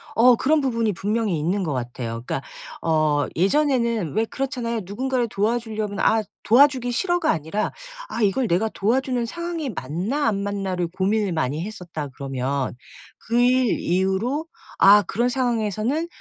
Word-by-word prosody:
어 245 +2 +6
그런 300 +6 +2
부분이 230 -5 0
분명히 205 -2 -1
있는 185 +6 0
것 155 -5 -2
같아요. 120 -2 -4
그러니까 135 - -2 0.4
어 155 -3 +2
예전에는 235 - +1
왜 220 - +1
그렇잖아요. 245 -3 -3
누군가를 250 +5 -1
도와주려면 215 -1 -2
'아 220 0 +3 0.2
도와주기 255 +1 +4
싫어.'가 350 +7 0
아니라 160 +7 -2 0.4
'아 230 - -3
이걸 215 +5 +2
내가 190 +4 +2
도와주는 245 +4 0
상황이 340 +2 -4
맞나 195 - -2
안 200 -3 0
맞나.'를 195 -3 -2
고민을 195 +3 0
많이 155 0 -1
했었다 180 -8 -6
그러면 135 0 -3 0.4
그 235 +2 0
일 250 -1 +3
이후로 190 - 0 0.3
'아 205 +1 +8
그런 235 +7 0
상황에서는 240 - 0
215 Hz, 340 characters per minute, -23 LUFS, 180-245 Hz, 0.4 s, 아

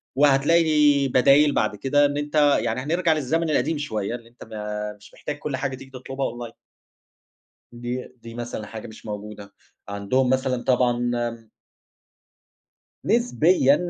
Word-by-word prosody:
وهتلاقي 145 0 +4
بدايل 140 +3 +5
بَعد - - 0
كده، 145 +7 +2
إن 145 0 -1
أنت 145 +1 -4 0.2
يعني 115 +2 -1
هنرجَع 165 +3 +1
للزمن 155 +3 0
القديم 155 +1 +1
شوية، 110 -7 -3
إن 115 -1 -11
أنت 120 +1 -14
ما 105 -1 -5
مش 105 - -18
محتاج 150 - -6
كل 145 -3 -3
حاجة 135 0 -2
تيجي 135 +1 -13
تطلُبها 135 0 -4 0.2
online - - -21 1.2
دي 120 +1 -5
دي 115 0 -10
مثلًا 120 -3 -5
حاجة 110 -1 -8
مش 110 0 -13
موجودة. 105 -1 -7 0.4
عَندهم 100 +6 0
مثلًا 130 -1 0
طبعًا 120 -1 +2
آمم 115 -2 -4 1.6
نسبيًا 180 - +3
130 Hz, 140 wpm, -24 LUFS, 115-145 Hz, 1.6 s, بدايل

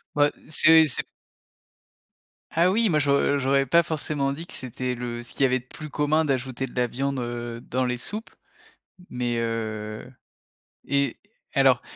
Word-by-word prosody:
Bah, 145 0 +4 0.2
c’est 160 +1 +6
c’est 130 - -2 1.5
Ah 170 +2 +3
oui! 225 +2 +3
Moi 155 -3 +3
j’au 140 0 +2
j’aurais 135 +1 +2
pas 170 +6 +4
forcément 150 -3 -2
dit 155 +5 -6
que - - -14
c'était 125 0 -4
le 120 -1 -5
ce 120 - -10
qu'il - - -7
y - - +7
avait 130 0 +2
de 120 - -19
plus 155 +4 -9
commun 150 +2 +1
d'ajouter 130 -2 -1
de - - -15
la 125 -1 +2
viande, 135 +3 -2
heu, 120 -1 -4
dans 130 +2 -1
les 125 0 -1
soupes. 215 - -5 0.8
Mais, 120 -1 -1
heu 110 -1 -3 0.8
et 140 -3 +1 0.4
alors, - - +4
135 Hz, 165 wpm, -25 LUFS, 120-150 Hz, 1.5 s, y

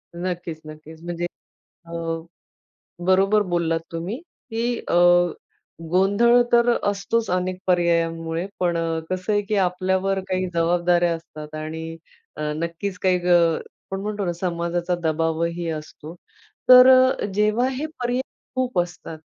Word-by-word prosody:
नक्कीच, 175 -2 -4
नक्कीच. 155 +1 -12
म्हणजे 175 0 -3 0.6
अ, 165 - -14 1.2
बरोबर 195 +3 +4
बोललात 165 -1 +1
तुम्ही 170 +8 -4 0.3
की 230 +1 -1
अ, - - -1 1.0
गोंधळ 205 +6 +4
तर 240 0 +5 0.2
असतोच 205 +3 -1
अनेक 185 0 -1
पर्यायांमुळे, 165 -1 +1
पण 175 -2 +1 0.3
कसं 185 +3 -2
आहे 205 - +2
की 210 - +1
आपल्यावर 190 +2 0
काही 185 0 -1
जबाबदाऱ्या 175 0 +2
असतात 155 -2 -10
आणि 160 +1 -6 0.4
अ, 155 - -7
नक्कीच 170 +4 -4
काही 185 -1 +3
अ, 175 - +5 0.6
आपण 195 0 -3
म्हणतो 205 -1 -3
ना 175 - -1
समाजाचा 175 0 -2
दबावही 165 +1 -1
असतो. 155 +1 -8 0.5
तर 250 0 +10 0.4
जेव्हा 215 +4 +2
हे 270 +4 -3
पर्याय 245 +1 0 0.3
खूप 255 -7 0
असतात, 175 -2 -4
180 Hz, 120 wpm, -23 LUFS, 165-200 Hz, 1.2 s, तर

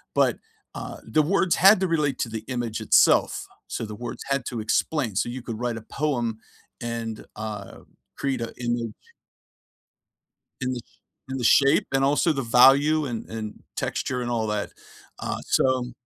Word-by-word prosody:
but, - - +3 0.4
uh, - - -6
the 155 - +3
words 185 +2 +2
had 195 +3 +7
to 190 - +1
relate 150 -6 0
to 115 - -1
the 110 -1 -5
image 120 -4 -3
itself, 110 - +4 0.2
so - - -4
the 105 0 -7
words 120 +3 -6
had 135 -2 0
to 120 - -4
explain, 115 +2 0
so 110 - +1
you 125 +2 -5
could 115 -2 -6
write 120 -2 -2
a - - -7
poem 120 -5 -1 0.4
and, 115 -2 -4
uh, 105 -2 -6 0.4
create 135 -3 -2
a 115 - -4
image 120 -2 -1 1.7
in 130 0 -1
the 125 - -4 0.5
in 135 - -2
the 125 - -3
shape 140 +4 +5
and 135 - +3
also 145 +4 +3
the 135 -2 -2
value 140 +6 +5
and 120 -4 -5
and 110 -2 -6 0.2
texture 125 -1 -2
and 120 0 -3
all 115 -2 0
that. 105 -1 -2 0.5
Uh, - - -3
so 130 -2 +2
120 Hz, 170 wpm, -25 LUFS, 115-140 Hz, 1.7 s, had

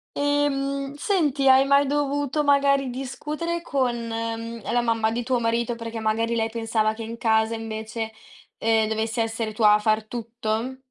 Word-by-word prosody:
Ehm, 280 -1 0
senti, 290 -5 +1
hai 265 +1 +7
mai 280 +1 +4
dovuto 290 0 0
magari 280 -2 +3
discutere 300 +7 -4
con, 260 -7 0
mhmm, - - -6 0.5
ehm, - - -2
la 240 - +2
mamma 225 -2 +1
di 235 +2 -2
tuo 250 0 0
marito 235 +1 0
perché 230 -1 -6
magari 225 +1 0
lei 225 0 0
pensava 225 -1 0
che 225 +1 -7
in 230 +1 -6
casa 220 0 +2
invece, 220 0 -5 0.5
ehm, 220 -1 +2
dovessi 220 +1 -2
essere 225 -1 -2
tua 210 -1 +5
a 210 - +4
far 215 0 +1
tutto? 230 +2 -3
235 Hz, 165 wpm, -24 LUFS, 225-275 Hz, 0.5 s, hai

